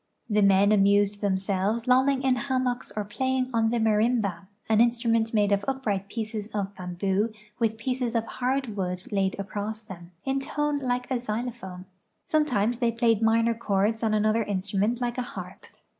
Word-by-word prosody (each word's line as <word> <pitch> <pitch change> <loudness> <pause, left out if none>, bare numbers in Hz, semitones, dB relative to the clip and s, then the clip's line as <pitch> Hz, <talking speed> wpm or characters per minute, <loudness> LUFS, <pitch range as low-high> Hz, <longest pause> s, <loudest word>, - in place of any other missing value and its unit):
The 210 -1 +2
men 200 +1 +5
amused 205 0 +3
themselves 200 +3 0
lolling 260 +1 +3
in 260 -1 +3
hammocks 255 -1 -1
or 210 -1 -3
])laying 260 -1 +1
on 225 -1 +2
the 240 - 0
marimba, 215 -4 +1 0.2
an 220 0 +4
instrument 230 -1 +2
made 205 -2 +2
of 200 0 +2
upright 215 -8 -1
pieces 215 -2 -4
of 200 -1 -2
bamboo 190 +4 -1 0.3
with 225 -2 +1
pieces 250 0 -2
of 225 -1 +1
hard 255 -2 -2
wood 180 -2 -3
laid 195 -2 +1
across 210 +2 -4
them, 175 -4 -10 0.2
in 270 0 0
tone 295 +1 -1
like 250 -2 -1
a 260 - +2
xyloplione. 215 -5 -5 0.4
Sometimes 245 -7 +1
they 235 -2 +2
played 230 -2 +2
minor 230 +1 +3
chords 220 0 0
on 220 -2 +1
another 215 +2 +2
instrument 205 +3 -1
like 240 0 -1
a 250 - -5
harp. - - -8
225 Hz, 165 wpm, -26 LUFS, 200-245 Hz, 0.4 s, men